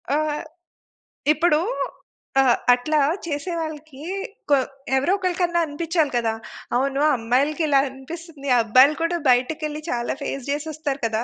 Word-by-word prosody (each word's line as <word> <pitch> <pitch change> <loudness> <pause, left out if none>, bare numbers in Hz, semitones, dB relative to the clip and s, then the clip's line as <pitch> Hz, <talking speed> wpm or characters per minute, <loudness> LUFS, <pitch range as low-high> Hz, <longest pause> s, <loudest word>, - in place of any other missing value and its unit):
ఆహ్, 300 0 0 0.9
ఇప్పుడు 310 0 +3 0.8
ఆహ్, 255 -3 +4 0.2
అట్లా 300 +5 +1 0.3
చేసేవాళ్ళకి 310 -2 -4 0.5
కొ 285 - +6 0.4
ఎవరో 280 +8 +2
ఒకలికన్నా 355 -2 0
అనిపిచ్చాలి 320 0 0
కదా! 230 -2 0 0.4
అవును. 275 +2 0 0.2
అమ్మాయిలకి 265 +8 +1
ఇలా 280 -2 +4
అనిపిస్తుంది. 285 +2 -9
అబ్బాయిలు 255 +7 +5
కూడా 340 +1 +1
బయటికెళ్లి 300 +5 +1
చాలా 240 -1 -1
ఫేస్ 275 -2 -4
జేసి 290 +2 -2
వస్తారు 290 -2 -3
కదా! 225 0 0
295 Hz, 120 wpm, -23 LUFS, 265-320 Hz, 0.9 s, కొ